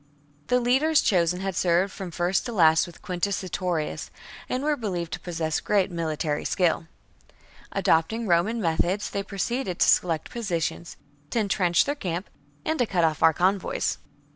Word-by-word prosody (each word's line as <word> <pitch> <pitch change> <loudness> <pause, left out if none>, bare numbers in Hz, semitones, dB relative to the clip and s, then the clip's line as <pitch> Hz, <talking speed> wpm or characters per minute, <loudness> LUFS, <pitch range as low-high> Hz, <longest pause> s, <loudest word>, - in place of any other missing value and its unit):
The 250 - +3
leaders 270 +6 +3
chosen 180 -1 +2
had 195 -1 -3
served 180 +3 +2
from 190 -3 -6
first 175 +2 0
to - - -4
last 160 -7 +4
with 175 - -14
Quintus 185 +3 -1
Sertorius,^ 180 -4 -3 0.4
and 255 +2 -1
were 300 0 +2
believed 180 - -4
to - - -3
possess 165 -3 -2
great 200 -3 +1
military 155 -3 -2
skill. 170 -3 +1 0.8
Adopting 220 +9 +1
Roman 200 +5 +2
methods, 180 +2 0
they 200 - -1
proceeded 200 0 -3
to - - +3
select 165 -3 +2
positions, 175 -7 -3 0.3
to - - -3
entrench 190 -4 +2
their 285 - 0
camp, 185 - -4 0.3
and 315 0 -1
to 245 - +2
cut 180 -4 +1
off 160 -2 +1
our 160 - +7
convoys. 185 +4 0
180 Hz, 160 wpm, -25 LUFS, 170-210 Hz, 0.8 s, our